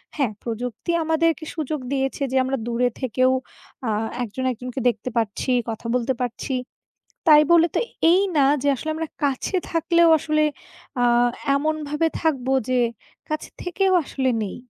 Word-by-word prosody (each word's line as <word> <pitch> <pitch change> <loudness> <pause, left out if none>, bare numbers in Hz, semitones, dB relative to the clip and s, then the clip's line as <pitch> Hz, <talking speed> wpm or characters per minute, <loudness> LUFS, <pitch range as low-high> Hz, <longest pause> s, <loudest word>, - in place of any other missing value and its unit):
হ্যাঁ, 265 -8 0
প্রযুক্তি 240 +6 -4
আমাদেরকে 320 0 +1
সুযোগ 310 -1 -2
দিয়েছে 270 +1 -1
যে 265 - -2
আমরা 265 +1 -1
দূরে 240 +1 +1
থেকেও 255 +1 +2 0.6
আ - - +1 0.3
একজন-একজনকে 250 +2 -3
দেখতে 230 +1 -4
পারছি, 225 +3 -1 0.2
কথা 225 +1 -6
বলতে 250 +1 +1
পারছি। 250 +2 -3 0.7
তাই 300 -1 +8
বলে 335 -1 +6
তো - - +3 0.3
এই 365 - +5 0.2
না 280 - +5 0.2
যে, 285 - +1
আসলে 315 +5 -4
আমরা 320 0 -4 0.2
কাছে 280 +7 0
থাকলেও 335 +1 +3
আসলে 305 0 +1 0.6
আ - - +4 0.5
এমনভাবে 305 +1 -1 0.2
থাকবো, 270 -5 0 0.2
যে 255 -1 +2 0.5
কাছে 310 0 -3
থেকেও 375 +2 +1
আসলে 265 -1 -1
নেই। 200 - -4
270 Hz, 145 wpm, -23 LUFS, 250-315 Hz, 0.7 s, তাই